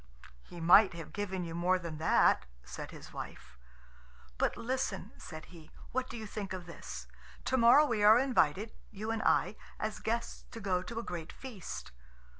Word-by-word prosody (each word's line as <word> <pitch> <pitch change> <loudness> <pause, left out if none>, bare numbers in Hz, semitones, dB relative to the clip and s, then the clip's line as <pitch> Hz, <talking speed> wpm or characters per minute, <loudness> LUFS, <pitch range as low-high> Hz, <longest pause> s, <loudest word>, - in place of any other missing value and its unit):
"He 175 - -11
might 175 +3 +7
have 165 -2 -8
given 190 -3 -2
you 165 -1 -5
more 180 +2 +2
than 165 -4 -6
that," 160 - +4 0.2
said 60 0 -7
his - - -11
wife. - - -8 0.8
"But - - +1
listen," 235 -5 -2
said 155 -1 -8
he; 160 -2 -13 0.2
"what 255 0 -1
do - - -6
you 220 - -6
think 205 -2 -5
of 185 -2 -5
this? 60 - -8 0.4
To 260 - +1
morrow 245 +5 +7
we 230 -7 0
are 215 +2 +9
invited, 220 - +2 0.2
you 215 +1 -4
and 225 -1 -1
I, 215 - +2 0.2
as 215 0 -3
guests, 235 +2 -2
to 230 - -8
go 190 -4 0
to 225 +5 -7
a 230 - -2
great 175 -6 -5
feast." 235 -9 -8
200 Hz, 180 wpm, -32 LUFS, 170-225 Hz, 0.8 s, are